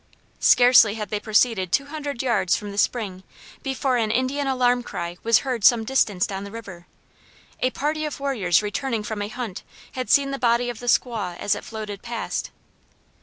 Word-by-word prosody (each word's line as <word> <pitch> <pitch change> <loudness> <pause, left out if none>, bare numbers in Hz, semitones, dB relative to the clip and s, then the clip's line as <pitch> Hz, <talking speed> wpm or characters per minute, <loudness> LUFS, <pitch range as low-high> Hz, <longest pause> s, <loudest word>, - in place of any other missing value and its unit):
Scarcely 245 -4 +6
had 210 -2 -5
they 210 - -2
proceeded 215 -4 +1
two 280 - +2
hundred 285 -4 -5
yards 205 -8 +2
from 205 -2 -5
the 200 - -3
spring 200 -5 -1 0.4
before 265 -1 -1
an 225 -2 0
Indian 260 +5 0
alarm 250 -2 +2
cry 175 -6 -6
was 230 0 +4
heard 250 -5 -2
some 230 +1 +6
distance 215 -6 +1
down 195 0 -5
the 200 - -7
river. 195 -5 -10 0.7
A 255 - +2
party 305 +4 -2
of 300 -2 -4
warriors 215 -11 +1
returning 225 +2 -2
from 220 -2 -4
a 205 - -2
hunt 225 -3 -6 0.3
had 255 -1 -5
seen 275 -1 +4
the 275 - -4
body 240 0 +2
of 230 - -11
the 245 - -8
squaw 215 -8 0
as 205 - 0
it - - -5
floated 215 -3 -7
past. 235 -1 -4
230 Hz, 185 wpm, -23 LUFS, 205-255 Hz, 0.7 s, Scarcely